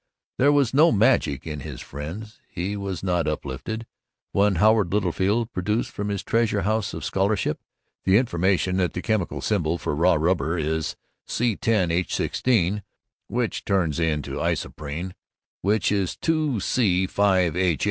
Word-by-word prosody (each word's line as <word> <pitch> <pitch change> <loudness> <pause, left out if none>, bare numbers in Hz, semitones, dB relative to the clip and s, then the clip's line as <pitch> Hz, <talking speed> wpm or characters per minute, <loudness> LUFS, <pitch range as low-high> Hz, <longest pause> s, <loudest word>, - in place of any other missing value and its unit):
There 140 +3 +5
was 140 -4 +2
no 155 +5 +6
magic 105 - +2
in 75 -2 -5
his - - -7
friends; 85 +10 -8
he 95 +4 -3
was 100 -3 -4
not 90 -4 0
uplifted 75 - -4 0.5
when 100 0 +3
Howard 105 0 +4
Littlefield 105 +4 0
produced 105 +5 -1
from 105 0 -4
his 100 -2 -2
treasure 110 -3 +1
house 110 0 0
of - - -5
scholarship 95 -4 0 0.4
the 95 +1 +5
information 95 -4 +1
that 90 -2 +1
the 90 - -4
chemical 110 -5 -1
symbol 85 -6 0
for - - -3
raw 85 +4 +3
rubber 80 0 +1
is 80 0 -1 0.3
C₁₀H₁₆, 105 -1 +1 0.5
which 120 -2 -2
turns 85 -6 0
into 75 -3 -1
isoprene, 80 +5 -3 0.5
or 100 +3 +2
2C₅H₈. 95 - +1
95 Hz, 125 wpm, -24 LUFS, 85-110 Hz, 0.5 s, no